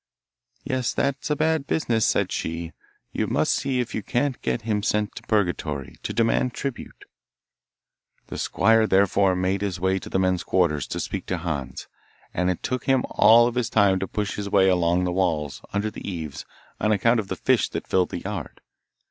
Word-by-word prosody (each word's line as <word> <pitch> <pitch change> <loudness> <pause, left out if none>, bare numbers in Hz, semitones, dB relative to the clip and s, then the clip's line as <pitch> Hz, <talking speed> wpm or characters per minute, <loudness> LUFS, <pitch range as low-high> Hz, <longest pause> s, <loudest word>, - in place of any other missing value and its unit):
'Yes, 130 -2 -1
that's 140 +1 -1
a 150 - +2
bad 155 -1 0
business,' 115 -8 +1
said - - +1
she; 80 +1 -3 0.4
'you - - -1
must - - +1
see 135 -2 -1
if 120 -2 -2
you 110 - -2
can't 130 +5 -1
get 115 - -2
him 105 -2 0
sent 105 0 0
to - - -8
Purgatory, 90 -9 -1
to - - -4
demand 115 +2 +1
tribute.' 135 -3 -6 1.2
The - - -7
squire 110 +1 +3
therefore 95 -1 +3
made 95 +2 0
his 95 -3 -2
way 95 +1 +1
to - - -9
the - - 0
men's 95 -1 +1
quarters, 75 -7 +1
to - - -4
speak - - -4
to 90 - -1
Hans, 80 -6 -4 0.5
and 90 +1 0
it 90 - -3
took 125 0 -2
him 135 -2 +3
all 120 +2 +6
his 125 -1 -1
time 100 -3 +3
to 95 - -3
push 105 0 -3
his 100 -1 -4
way 95 -1 +4
along 90 0 +2
the 90 - 0
walls, 80 -6 -1
under 105 +2 -1
the - - -9
eaves, 80 -6 -6 0.3
on 110 - +1
account 115 +3 +3
of 105 - -3
the - - -3
fish - - +2
that - - -5
filled 90 -1 +1
the 85 - -5
yard. 95 -6 -6
100 Hz, 190 wpm, -24 LUFS, 90-115 Hz, 1.2 s, all